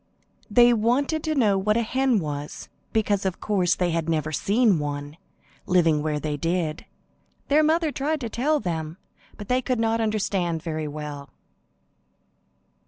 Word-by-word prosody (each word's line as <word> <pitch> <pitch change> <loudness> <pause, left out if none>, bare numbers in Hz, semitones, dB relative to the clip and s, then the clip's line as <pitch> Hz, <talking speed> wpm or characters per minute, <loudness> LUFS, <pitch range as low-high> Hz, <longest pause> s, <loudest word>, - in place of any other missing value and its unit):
They 240 +3 +6
wanted 260 +8 +1
to 310 -1 0
know 210 -8 +3
what 210 +3 +1
a 235 - +1
hen 260 +1 +1
was, 150 -4 -5 0.2
because 205 -2 +1
of 190 -2 -2
course 190 -5 +1
they 180 -1 0
had 165 0 -1
never 155 -1 0
seen 205 - +2
one, 145 0 -4 0.5
living 165 -4 +3
where 150 -1 -1
they 150 -1 -3
did. 165 0 -2 0.6
Their 295 +2 +5
mother 320 0 +2
tried 295 +2 -2
to 235 - -2
tell 290 +7 +1
them, 160 - -4 0.4
but 205 - -8
they 250 +2 +1
could 255 -1 -1
not 225 0 +1
understand 195 -6 -1
very 155 -2 -3
well. 145 -1 -7
195 Hz, 155 wpm, -24 LUFS, 155-240 Hz, 0.6 s, They